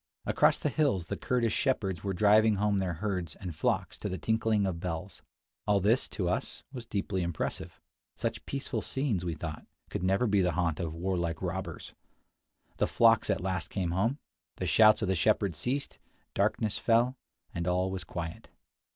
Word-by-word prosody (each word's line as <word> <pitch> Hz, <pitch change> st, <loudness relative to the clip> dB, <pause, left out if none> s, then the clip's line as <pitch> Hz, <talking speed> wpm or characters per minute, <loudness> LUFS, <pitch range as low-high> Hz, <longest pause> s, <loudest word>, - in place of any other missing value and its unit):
Across -, -, +4 dB
the 150 Hz, -, -1 dB
hills 135 Hz, -, +1 dB
the -, -, -3 dB
Kurdish 120 Hz, -3 st, 0 dB
shepherds 100 Hz, -, 0 dB
were 100 Hz, -, -1 dB
driving 105 Hz, +3 st, +5 dB
home 100 Hz, 0 st, +1 dB
their 95 Hz, -2 st, -1 dB
herds 90 Hz, -4 st, -3 dB
and 90 Hz, -3 st, -6 dB
flocks -, -, -1 dB
to -, -, -3 dB
the 95 Hz, -, -3 dB
tinkling 110 Hz, +3 st, +1 dB
of 90 Hz, -3 st, -2 dB
bells. 90 Hz, +2 st, -5 dB, 0.5 s
All 100 Hz, -1 st, +4 dB
this, 110 Hz, +7 st, +2 dB
to 90 Hz, -, -2 dB
us, 90 Hz, -, -2 dB
was 120 Hz, -3 st, -7 dB
deeply 100 Hz, -3 st, -1 dB
impressive. 85 Hz, -2 st, -3 dB, 0.4 s
Such -, -, -3 dB
peaceful 140 Hz, -1 st, -3 dB
scenes, 130 Hz, -10 st, -1 dB
we 85 Hz, -2 st, -2 dB
thought, 80 Hz, 0 st, -6 dB, 0.3 s
could -, -, -3 dB
never 95 Hz, +6 st, +2 dB
be 100 Hz, -3 st, +3 dB
the 90 Hz, -2 st, +1 dB
haunt 80 Hz, -2 st, 0 dB
of 85 Hz, -, -1 dB
II -, -, -3 dB
55 85 Hz, -, -8 dB
warlike 85 Hz, -4 st, -1 dB
robbers. -, -, -4 dB, 0.8 s
The -, -, +2 dB
flocks -, -, +4 dB
at -, -, +1 dB
last 95 Hz, -2 st, -2 dB
came 90 Hz, -4 st, -2 dB
home; 110 Hz, +10 st, +1 dB, 0.4 s
the -, -, -3 dB
shouts 110 Hz, 0 st, +6 dB
of -, -, 0 dB
the 95 Hz, -, +2 dB
shepherds 95 Hz, -2 st, +1 dB
ceased; 140 Hz, +3 st, -2 dB, 0.3 s
darkness 105 Hz, -2 st, +1 dB
fell; 120 Hz, +2 st, +3 dB, 0.4 s
and 85 Hz, 0 st, -3 dB
all 90 Hz, +1 st, +1 dB
was 95 Hz, -2 st, -4 dB
quiet. 85 Hz, -1 st, -6 dB
95 Hz, 185 wpm, -30 LUFS, 85-110 Hz, 0.8 s, shouts